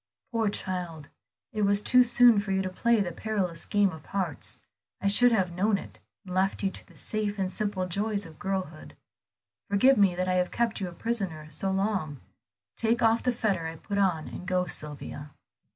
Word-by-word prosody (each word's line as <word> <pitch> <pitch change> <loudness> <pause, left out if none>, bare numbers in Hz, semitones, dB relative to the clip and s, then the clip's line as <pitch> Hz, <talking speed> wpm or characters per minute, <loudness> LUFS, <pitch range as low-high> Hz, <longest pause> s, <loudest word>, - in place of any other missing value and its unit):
"Poor 225 -3 +1
child, 175 -6 -4 0.4
it 215 - -2
was 200 0 +4
too 250 +4 +5
soon 240 -2 +6
for 200 -1 -3
you 190 0 +1
to 185 - -3
play 235 +4 +2
the 185 -3 -1
perilous 185 -3 -2
game 205 -2 +3
of 160 -2 -10
hearts. 185 -7 -2 0.4
I - - -7
should 240 +5 +5
have 190 -6 +1
known 200 +4 +1
it, - - -10 0.3
and 185 - -7
left 190 +2 +1
you 195 - +1
to - - -12
the - - -19
safe 210 -1 -2
and 190 -1 -2
simple 205 -3 -2
joys 200 +2 -1
of 160 -2 -13
girlhood. 190 -6 -4 0.7
Forgive 230 +7 +5
me 195 -3 +4
that 185 +1 -1
I 185 - +1
have 180 - -3
kept 230 -3 -1
you 190 - -1
a - - -7
prisoner 180 -6 -2
so 195 +6 -1
long; 190 -7 -1 0.6
take 235 +1 +1
off 225 +1 +4
the 250 - +1
fetter 200 -8 -1
I 160 - -6
put 200 +5 -4
on, 180 -6 +1
and 180 - -8
go, 180 0 +1
Sylvia." 150 -2 -4
195 Hz, 200 wpm, -28 LUFS, 180-215 Hz, 0.7 s, soon